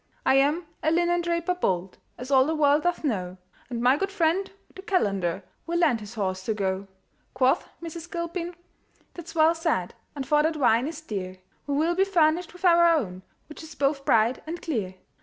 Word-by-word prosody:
"I - - +4
am 295 +5 +2 0.2
a 310 - +2
linendraper 345 +1 +1
bold, 185 0 -1 0.2
As 250 +3 -7
all 265 0 +5
the 320 - 0
world 295 0 +3
doth 350 0 -1
know, 185 - -2 0.3
And 240 -2 -4
my 255 +3 +5
good 390 +4 -2
friend 375 +1 +1 0.2
the 380 - -10
calender 200 - 0 0.2
Will 340 +1 -1
lend 305 -9 +3
his 210 +2 -10
horse 185 -3 -2
to 220 - -1
go." 195 -1 -2 0.5
Quoth 260 0 +2
Mrs. 335 +1 -7
Gilpin, 340 0 -4 0.6
"That's 345 -1 -10
well 320 +1 +5
said; 325 - -1 0.2
And 275 -2 -4
for 300 -1 +4
that 315 +1 0
wine 245 -2 +3
is 320 -1 -6
dear, 190 -9 -5 0.3
We 285 - -1
will 320 +4 +2
be 380 +2 +3
furnished 345 -3 +2
with 360 +1 -8
our 340 -1 +6
own, 185 - -3 0.3
Which 300 - -11
is 315 -1 -11
both 275 0 0
bright 230 0 +2
and 340 +2 -4
clear." 215 - -3
305 Hz, 190 wpm, -26 LUFS, 225-340 Hz, 0.6 s, our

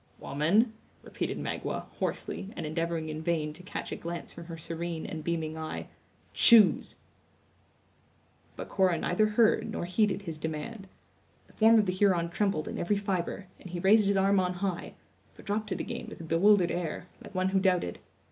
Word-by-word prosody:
"Woman," 190 - +2 0.3
repeated - - -4
Magua, - - -3
hoarsely, 195 - -3
and 165 - -4
endeavoring 165 0 -2
in 155 0 -5
vain 155 -2 -1
to 165 - -13
catch 180 - -6
a - - -2
glance 170 0 -6
from 170 - -10
her 165 -1 -7
serene 165 0 -5
and 155 -1 -6
beaming 160 -1 -2
eye, 155 0 -5 0.4
"choose!" 225 -5 +6 1.6
But - - -6
Cora 185 -3 +2
neither 195 +6 +2
heard 215 +1 +3
nor 215 - -3
heeded 200 +2 +1
his 165 -4 -6
demand. 160 +7 -5 0.6
The - - -23
form 225 +1 +6
of 215 - +4
the 185 - 0
Huron 185 -3 +2
trembled 195 -5 0
in - - -4
every 205 +4 +1
fibre, 195 -1 -2
and 185 - -11
he 175 0 -4
raised 200 +3 +5
his 200 0 +2
arm 195 0 +4
on 180 -1 0
high, 180 -1 -3 0.4
but - - -15
dropped 210 +1 -2
it - - -2
again - - -5
with - - -10
a - - -7
bewildered 175 +3 +4
air, 175 0 -3 0.2
like - - -12
one 185 0 +1
who 190 0 +2
doubted. 180 - +1
180 Hz, 180 wpm, -29 LUFS, 165-200 Hz, 1.6 s, choose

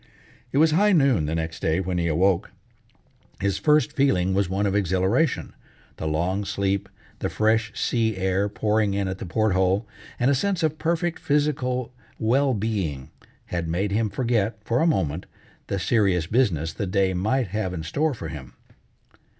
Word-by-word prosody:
It - - -1
was 160 +2 +5
high 205 +6 +4
noon 135 - +3
the 80 - -1
next 80 0 -3
day 80 +2 +1
when 90 -1 -2
he 85 - 0
awoke. 85 +3 +1 0.9
His 100 0 0
first 150 +5 +3
feeling 95 -10 +2
was 100 -1 +1
one 100 +2 0
of 100 - 0
exhilaration: 100 - +1 0.4
the 80 - -3
long 90 +6 0
sleep, 100 0 -1 0.3
the - - -2
fresh 110 0 +1
sea 110 -4 0
air 95 +2 0
pouring 105 -1 0
in 100 -1 0
at 95 0 -4
the - - -6
port 110 +3 +1
hole, 95 +3 +1 0.3
and 125 +3 +3
a - - +4
sense 180 +5 0
of 155 0 0
perfect 170 +1 -1
physical 130 -4 0 0.2
well 130 +4 +2
being 95 -11 -3 0.4
had 85 -1 -1
made 95 +5 -1
him 110 +1 +1
forget, 115 -1 0
for 120 +2 +1
a 165 - +3
moment, 90 - 0 0.4
the 100 - -2
serious 95 -4 +2
business 85 - +1
the 100 - -3
day 95 0 +1
might 110 +5 0
have 105 -1 -2
in 80 -3 -5
store 145 - 0
for 80 -8 -6
him. 70 -4 -9
100 Hz, 175 wpm, -24 LUFS, 90-125 Hz, 0.9 s, was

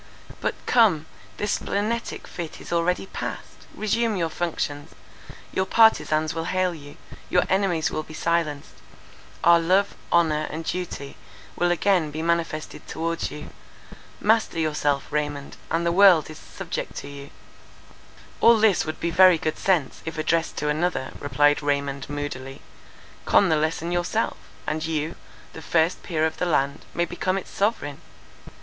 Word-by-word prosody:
But, - - -1
come, 200 -11 +4 0.3
this 205 0 -1
splenetic 220 +3 -2
fit 170 -3 -7
is - - -7
already 170 +2 +1
passed; - - -7
resume 225 +1 0
your 170 -3 0
functions; 150 -4 -3 0.6
your 190 0 0
partizans 155 -9 +4
will 165 0 -3
hail 185 0 0
you; 145 -3 -11 0.3
your 180 - +3
enemies 190 -5 +1 0.2
be - - -10
silenced; 155 - -1 0.7
our 170 0 +7
love, 185 +4 +2 0.2
honour, 160 -3 +3
and 160 +1 -5
duty 175 -6 -4 0.4
will 175 - +1
again 175 -2 +2
be 155 +2 -5
manifested 165 -2 -2
towards 165 +1 -2
you. 150 - -9 0.7
Master 220 -4 +2
yourself, 150 -3 0
Raymond, 145 -1 -3
and 165 +1 0
the 170 - +2
world 180 -4 +6
is 155 - -11
subject - - -6
to - - -6
you." 140 0 -9 1.1
"All 230 -1 +7
this 215 -4 +3
would 155 0 -5
be 170 - -1
very 185 0 +7
good 155 0 -3
sense, 175 -9 +1
if 160 0 -6
addressed 160 +1 0
to 150 - -1
another," 155 -2 -1
replied 145 +1 +2
Raymond, 140 -1 -1
moodily, 135 -2 -5 0.6
"con 195 - +4
the 160 - +4
lesson 160 +2 -1
yourself, 175 +6 0 0.3
and 155 +1 -2
you, 160 0 -2 0.4
the 160 - -9
first 165 +2 +1
peer 160 -3 0
of 160 0 -2
the 180 - -1
land, 140 -3 0
may 175 - +2
become 185 +2 -1
its 195 - -6
sovereign. 195 -9 -1
165 Hz, 150 wpm, -24 LUFS, 150-180 Hz, 1.1 s, our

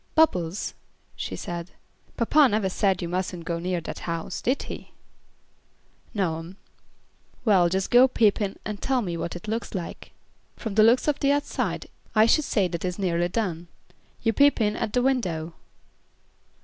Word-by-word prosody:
"Bubbles," 185 - +2 0.4
she - - -4
said, 170 0 -5 0.5
"papa 285 +5 +5
never 210 -3 +1
said 190 -1 +1
you - - -2
mustn't 180 -1 -3
go 170 0 -2
near 180 +1 -1
that - - -6
house, 165 -1 -4
did 255 +3 0
he?" - - -8 1.2
"No 180 -7 -1
'm." 170 +4 -10 0.9
"Well, 190 -6 +5
just 190 +2 -1
go 245 +2 +8
peep 220 -5 +2
in 200 -1 -2
and 210 -1 -5
tell 260 -3 +1
me 175 -4 -3
what 170 +1 -4
it 175 +4 -8
looks 225 0 -3
like. 175 -3 -6 0.4
From 220 - -5
the 215 - +5
looks 235 +6 +5
of 295 - +1
the 280 - +3
outside, 285 0 -1 0.3
I 215 0 +7
should 295 +6 +3
say 200 -4 +2
that 170 -1 -4
it - - 0
is 180 - -4
nearly 175 -3 +1
done. 175 -5 -2 0.6
You 225 - +2
peep 285 +4 +4
in 210 -1 +1
at 210 - -3
the 250 - +2
window." 180 -12 0
195 Hz, 175 wpm, -25 LUFS, 175-230 Hz, 1.2 s, go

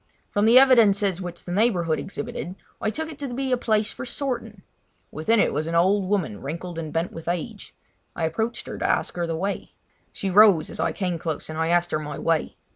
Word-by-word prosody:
From 205 +1 +2
the 230 +3 +7
evidences 205 -8 +5
which 175 -1 -7
the 175 - -6
neighbourhood 180 -6 +2
exhibited 200 -2 -5 0.3
I 215 - +1
took 320 +7 -4
it 290 - -12
to 280 -3 -4
be 265 +2 -2
a - - +5
place 220 -3 0
for - - -7
sorting. 240 -6 -4 0.5
Within 220 +9 +1
it - - +2
was 155 +2 -1
an 165 - -2
old 190 +3 +3
woman 175 - -1
wrinkled 165 +4 -5
and 155 -2 -5
bent 165 +2 -1
with 165 0 -10
age; 185 +5 -4 0.4
I 170 - -3
approached 220 +9 -2
her - - -7
to - - 0
ask - - 0
the 170 -2 -2
way. 195 +5 -3 0.4
She 195 - -3
rose 200 -4 +6
as - - -8
I 165 +1 +1
came 180 -4 -2
close 160 -1 -4
and 155 - -5
I 160 - +1
asked 175 +1 +2
her 155 - 0
my 150 -1 -6
way. 165 -2 0
185 Hz, 215 wpm, -24 LUFS, 165-220 Hz, 0.5 s, the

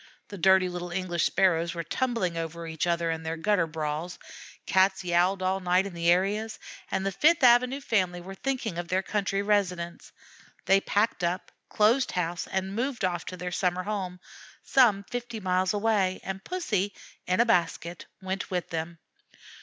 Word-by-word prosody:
The 200 - -7
dirty 190 +1 +5
little 175 0 -5
English 175 -2 -1
Sparrows 170 -2 +2
were 170 - -3
tumbling 215 -1 -1
over 165 0 -4
each 160 +1 -2
other 170 -1 +1
in 160 0 -3
their 160 0 -4
gutter 180 0 +1
brawls, 155 +2 -4 0.5
Cats 190 0 +3
yowled 180 +2 +2
all 190 +1 +1
night 180 +1 +2
in 200 - -6
the 170 0 0
areas, 205 +5 +1 0.3
and 190 - -1
the 195 - 0
Fifth 305 - +3
Avenue 250 +2 +5
family 185 -8 0
were 185 +2 -9
thinking 225 -5 -3
of 175 - -4
their 185 +2 0
country 200 -1 -1
residence. 180 -5 -1 0.5
They 195 0 +4
packed 205 -2 0
up, 175 +2 -2 0.2
closed 230 +6 +3
house 175 -1 -2
and 190 0 -2
moved 245 -2 -1
off 175 -2 -2
to 185 - -6
their 180 0 -4
summer 180 0 0
home, 185 -3 -4 0.4
some 220 -7 +4
fifty 240 +1 -5
miles 185 -1 +1
away, 205 -3 +1
and 190 0 -5
Pussy, 205 - -2 0.3
in 185 +2 +1
a 235 - +6
basket, 175 -5 0 0.2
went 190 +1 -3
with 180 -2 -3
them. 165 +1 -4
185 Hz, 170 wpm, -27 LUFS, 175-205 Hz, 0.5 s, a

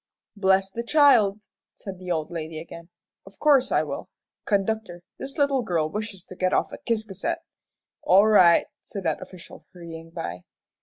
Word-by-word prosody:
"Bless 195 -1 +2
the 230 - -4
child!" 235 -7 +4 0.3
said 190 -2 -9
the 180 -1 -8
old 160 -2 -1
lady 160 -1 -5
again, 170 +1 -11 0.3
"of 195 - -16
course 280 -4 +4
I - - +3
will. - - -6 0.4
Conductor, 200 -3 -1 0.2
this 275 +3 -6
little 280 -3 +2
girl 165 -8 -1
wishes 210 -3 -5
to 185 - -12
get 185 0 0
off - - +1
at - - -11
Ciscasset." 220 - -1 0.6
"All 195 +3 +5
right," 185 -6 +6 0.2
said 200 - -7
that 160 -3 -1
official, 185 -3 -12
hurrying 165 -2 -10
by. 90 - -6
195 Hz, 160 wpm, -25 LUFS, 170-220 Hz, 0.6 s, right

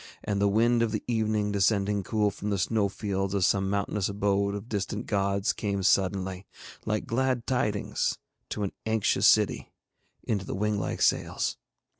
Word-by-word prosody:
And 100 -1 -1
the 100 - +4
wind 115 +3 +3
of 115 -2 +1
the 110 - -2
evening 110 -3 0
descending 100 0 +2
cool 105 +1 0
from 105 - -5
the 100 - 0
snowfields 100 -1 -1
of 95 -3 +3
some 95 0 +2
mountainous 100 0 -1
abode 100 0 0
of 100 +2 -6
distant 105 -1 -3
gods 100 0 0
came 100 -2 -2
suddenly, 95 -1 +1 0.4
like 105 -1 -1
glad 125 0 0
tidings 105 -5 0 0.3
to 105 - -3
an 100 - -2 0.2
anxious 110 -2 +3
city, - - +3 0.5
into 100 -4 -1
the - - -5
wing 105 +1 0
like - - -2
sails. - - +1
100 Hz, 160 wpm, -28 LUFS, 100-110 Hz, 0.5 s, the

